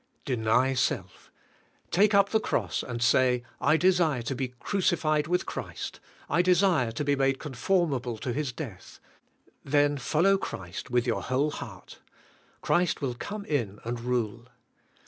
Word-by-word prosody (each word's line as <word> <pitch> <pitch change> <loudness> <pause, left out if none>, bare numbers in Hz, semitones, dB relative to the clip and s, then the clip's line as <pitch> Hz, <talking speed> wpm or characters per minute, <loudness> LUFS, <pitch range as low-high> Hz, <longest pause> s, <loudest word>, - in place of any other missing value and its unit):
Deny 125 0 +2
self. 125 - -2 0.6
Take 205 +3 +4
up 200 0 +5
the 220 - +2
cross - - -1
and 120 -1 -4
say, 125 0 +3 0.2
I 150 +4 +3
desire 170 -8 +2
to 130 - -2
be 130 0 -2
crucified 155 -3 +1
with 180 +1 0
Christ; - - -6 0.3
I 170 +4 +3
desire 180 - +3
to 130 - -2
be 145 0 +2
made 135 0 +1
conformable 135 - -1
to 120 +3 -3
His 145 -1 -2
death," 115 - -9 0.6
then 145 0 +2
follow 180 +9 +3
Christ 90 - -6
with 120 -1 +1
your 120 - 0
whole 135 +4 0
heart. - - -9 0.6
Christ 175 -1 +1
will 130 -3 0
come 200 - -6
in 115 - -2
and 120 +1 -3
rule. 120 -1 -2
135 Hz, 145 wpm, -28 LUFS, 120-170 Hz, 0.6 s, up